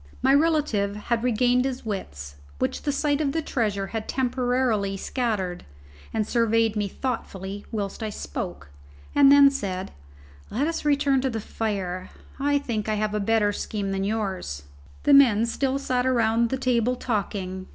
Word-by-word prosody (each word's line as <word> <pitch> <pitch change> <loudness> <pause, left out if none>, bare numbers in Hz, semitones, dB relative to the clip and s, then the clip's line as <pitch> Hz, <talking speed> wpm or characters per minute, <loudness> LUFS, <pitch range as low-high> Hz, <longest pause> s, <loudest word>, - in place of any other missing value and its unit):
My 265 +1 +5
relative 285 -10 +2
had 225 +2 -2
regained 250 +1 +3
his 265 -2 -3
wits, 70 - -5 0.2
which - - -1
the 290 - 0
sight 290 +1 0
of 280 -2 0
the 325 - 0
treasure 210 -8 -1
had 220 -1 -3
temporarily 245 -5 0
scattered, 200 -6 -2 0.5
and 215 -1 0
surveyed 230 -2 +2
me 205 -1 0
thoughtfully 200 -4 -5
whilst 205 -1 -4
I 220 - -2
spoke; 70 - -6 0.4
and 280 -1 +7
then 280 -1 +8
said, 190 -8 -4 0.6
"Let 250 +7 0
us 330 -1 -3
return 280 -2 +3
to 265 - 0
the 225 -2 -3
fire; 195 -4 -3 0.3
I 285 +1 +2
think 225 -6 -3
I 215 - +1
have 210 0 -1
a 210 - 0
better 210 0 +2
scheme 200 -1 -3
than 195 0 -1
yours." 195 - -3 0.4
The 285 - +4
men 235 -6 +6
still 265 +3 0
sat 255 -2 0
around 230 -2 +2
the 265 - -1
table 250 -1 +1
talking. 195 -5 -3
225 Hz, 160 wpm, -25 LUFS, 200-260 Hz, 0.6 s, then